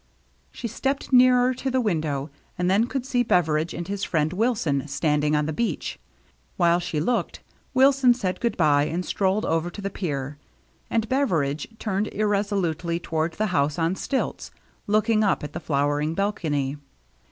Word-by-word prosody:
She 235 - -6
stepped 270 +5 -3
nearer 250 0 +6
to 265 +1 -3
the 260 0 +1
window 155 - -1 0.3
and 180 +1 +1
then 215 +5 +3
could 260 -1 -3
see 255 -2 +1
Beveridge 160 -7 +1
and 175 - -5
his 200 0 -4
friend 155 0 0
Wilson 180 - 0
standing 150 +1 +1
on 150 0 +1
the 155 - -2
beach. 235 +8 -2 0.6
While 170 -1 +4
she 175 -3 -3
looked, 235 +10 -1 0.3
Wilson 265 -2 +5
said 185 -6 -2
good 235 -3 -1
by, 145 -4 +4
and 175 +4 -3
strolled 195 +2 0
over 165 +1 0
to 175 - -10
the 195 0 -3
pier; 145 -6 -4 0.5
and 225 -1 0
Beveridge 165 - 0
turned 210 -1 -1
irresolutely 195 -5 0
toward 160 -1 -2
the 215 - -1
house 145 0 +1
on 165 +1 +1
stilts, 270 +6 -3 0.4
looking 215 +1 +3
up 195 - +1
at 150 -1 -6
the - - -4
flowering 145 +2 0
balcony. 150 -9 -1
180 Hz, 165 wpm, -24 LUFS, 155-225 Hz, 0.6 s, nearer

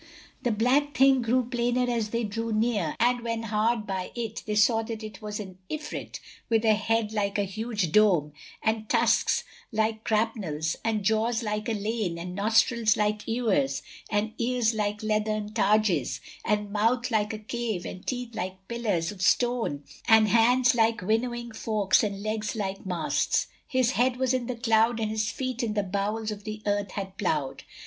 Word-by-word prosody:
The 245 - 0
black 260 +7 +2
thing 265 -1 +5
grew 245 +2 +1
plainer 245 +1 0
as 230 -3 -1
they 235 +1 -1
drew 225 +2 -3
near, 215 -7 0
and 245 +1 +3
when 230 -1 -3
hard 220 +1 0
by 190 -2 -4
it, 225 -2 -4
they 210 - -1
saw 225 +2 +4
that 225 -1 -6
it 215 +1 -8
was 210 0 -5
an 190 -3 -8
Ifrit, 305 -1 -5 0.3
with 225 -1 +2
a 220 - +6
head 220 0 0
like 205 -1 0
a 205 - +2
huge 205 -2 -2
dome 175 -8 +4 0.3
and 220 -1 0
tusks - - +3 0.3
like 220 0 0
grapnels 205 -9 -1
and 220 -2 0
jaws 220 +3 +1
like 210 0 -2
a - - +1
lane 210 -4 -2
and 180 +1 -6
nostrils 220 +2 +3
like 210 0 0
ewers 190 - +1 0.3
and 215 +1 0
ears 240 -1 +1
like 210 0 -2
leathern 215 0 -1
targes 200 - +2 0.2
and 210 -1 0
mouth 230 +4 +1
like 210 -2 +1
a 220 - -4
cave 215 -3 -3
and 185 - -8
teeth 245 -2 -3
like 185 -1 -5
pillars 210 -9 -1
of 200 -3 -10
stone 230 - +1 0.2
and 220 -2 +6
hands 245 +4 +4
like 225 -2 +2
winnowing 235 +3 -1
forks 215 -3 +2
and 200 -2 -3
legs 215 0 -2
like 195 -2 -4
masts: 175 -4 +1 0.2
his 255 -2 +2
head 250 -1 +1
was 260 0 +1
in 250 -2 -1
the 250 - -2
cloud 230 0 +2
and 215 -1 -1
his 215 -1 0
feet 255 +1 -3
in 220 -3 -2
the 205 - +1
bowels 205 +3 -2
of 205 -1 -7
the 215 0 -6
earth 205 -1 -1
had 195 -1 -5
plowed. 150 -8 -1
220 Hz, 180 wpm, -27 LUFS, 205-235 Hz, 0.3 s, a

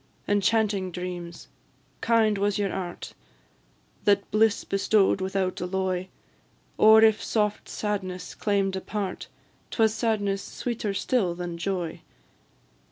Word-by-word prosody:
Enchanting 205 -2 +1
dreams! 175 -3 -6 0.5
kind 220 -3 +3
was 205 0 +1
your 200 -2 -1
art 180 -2 -5 0.9
That 200 -1 +2
bliss 215 0 +3
bestow'd 195 0 +2
without 190 -1 -1
alloy; 185 0 -1 0.7
Or 220 +1 +7
if 220 -1 +4
soft 210 -2 -1
sadness 185 -4 -4
claim'd 195 -2 0
a 190 - -3
part, 200 -3 -4 0.4
'Twas 220 -2 +2
sadness 215 -3 0
sweeter 225 -4 -4
still 195 -7 0
than 175 -1 -5
joy. 175 -3 -3
195 Hz, 110 wpm, -26 LUFS, 185-215 Hz, 0.9 s, Or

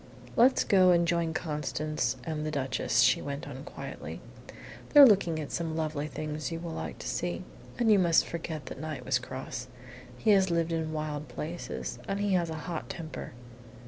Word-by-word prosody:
"Let's 250 +3 +5
go 185 -2 +5
and 170 -1 +4
join 170 -1 +1
Constance 150 -4 -2
and 155 -2 -3
the 155 - -2
Duchess," 135 -4 +1
she - - +5
went 140 0 -5
on, 135 -1 -7
quietly. - - -7 0.7
"They're 290 -1 +10
looking 185 -8 +4
at 150 - -5
some 165 -2 -2
lovely 155 -2 -2
things 155 +1 -4
you 165 - -3
will 170 0 -5
like - - -5
to - - -7
see. - - -2 0.3
And 235 -3 +3
you 205 - +6
must 170 -3 +4
forget 160 -4 -5
that 130 - -8
Knight 155 -2 -5
was 130 -1 +2
cross. 125 -1 -6 0.5
He 215 - +3
has 190 -2 +5
lived 170 -1 +1
in 160 -1 -1
wild 155 -1 -3
places, 170 +3 -5
and 195 - -1
he 205 -1 +1
has 175 -2 +2
a 160 - -4
hot 170 -3 -4
temper." 160 -3 -6
160 Hz, 185 wpm, -29 LUFS, 150-175 Hz, 0.7 s, They're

